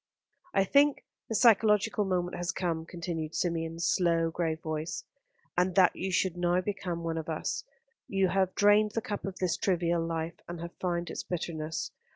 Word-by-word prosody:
"I 195 - +5
think 285 +7 +3 0.2
the 225 - -1
psychological 215 -2 +4
moment 180 -2 -1
has 175 -1 -2
come," 165 -3 -2
continued 165 -2 -4
Symeon's 165 -1 -1
slow, 165 -2 +2
grave 160 -1 -1
voice, 155 +1 -4 0.5
"and 180 0 +1
that 185 -2 +5
you 190 +1 -3
should 185 -1 +1
now 175 0 +2
become 180 -3 -3
one 165 -1 -1
of 160 - -6
us. 160 - -2 0.4
You 195 -2 +2
have 190 0 +1
drained 205 +1 +4
the 225 - +1
cup 205 - -4
of 195 -1 -5
this 185 -2 0
trivial 170 -3 +1
life, 165 0 -3
and 175 -1 -6
have 170 +1 -6
found 175 -1 -1
its - - -4
bitterness. 160 -2 -4
175 Hz, 175 wpm, -30 LUFS, 165-190 Hz, 0.5 s, I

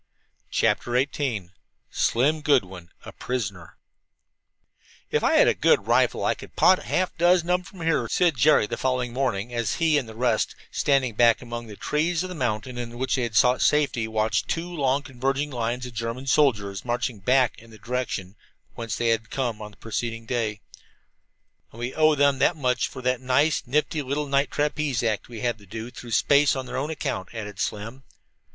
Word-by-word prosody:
CHAPTER 120 - +1
XVIII 130 -9 -2 0.4
SLIM 145 +7 +1
GOODWIN 95 - 0 0.2
A - - -8
PRISONER 100 -9 -5 1.3
"If - - +1
I - - +3
had - - +6
a - - +4
good - - +3
rifle - - +2
I - - +3
could - - -13
'pot' 185 0 +4
half 185 0 0
a - - -38
dozen 175 0 +3
of 180 - +4
them - - -14
from 180 -1 -13
here," 160 -7 +1
said 175 -4 +2
Jerry 145 -2 +4
the 120 +3 -4
following 125 -2 -1
morning 120 -4 -1
as 120 -2 -1
he 160 -3 +3
and 120 -5 -7
the 110 - -10
rest, 120 -2 0 0.2
standing 135 -4 +1
back 115 +2 +4
among 120 -1 -6
the 105 - -9
trees 160 - 0
of 185 - -5
the - - -5
mountain 125 -3 -3
in 120 0 -6
which 130 +1 -1
they 130 - +1
had 115 -2 -3
sought 125 +3 +4
safety, 140 -6 +2
watched 110 0 0
two 170 +2 -3
long, 140 -3 +1
converging 135 +3 -2
lines 120 0 -2
of 125 - -8
German 115 +3 -4
soldiers 105 -9 +1
marching 120 -2 -2
back 125 +4 +2
in 115 - -16
the 110 - -14
direction 110 -5 -4 0.4
whence 115 -2 -4
they 120 -1 0
had 110 -2 0
come 120 -5 -2
on 105 - -7
the 105 - -20
preceding 115 +1 -4
day. 110 -4 -2 1.1
"And - - -15
we 120 +2 -3
owe 155 -1 +4
them 140 -1 +3
that 165 - +3
much 125 -4 0
for 130 - -10
that 125 0 0
nice, 140 +5 +2
nifty 150 +3 0
little 145 +2 -2
night 140 -1 +1
trapeze 145 -4 -1
act 110 -1 -1
we 115 -3 -8
had 120 -2 -1
to 100 - -17
do 110 +4 -7
through 120 - -10
space 140 +6 +4
on 130 -1 -4
their 125 +1 -4
account," 135 - -3
added 105 -2 -6
Slim. 115 +5 -4
125 Hz, 195 wpm, -25 LUFS, 115-140 Hz, 1.3 s, had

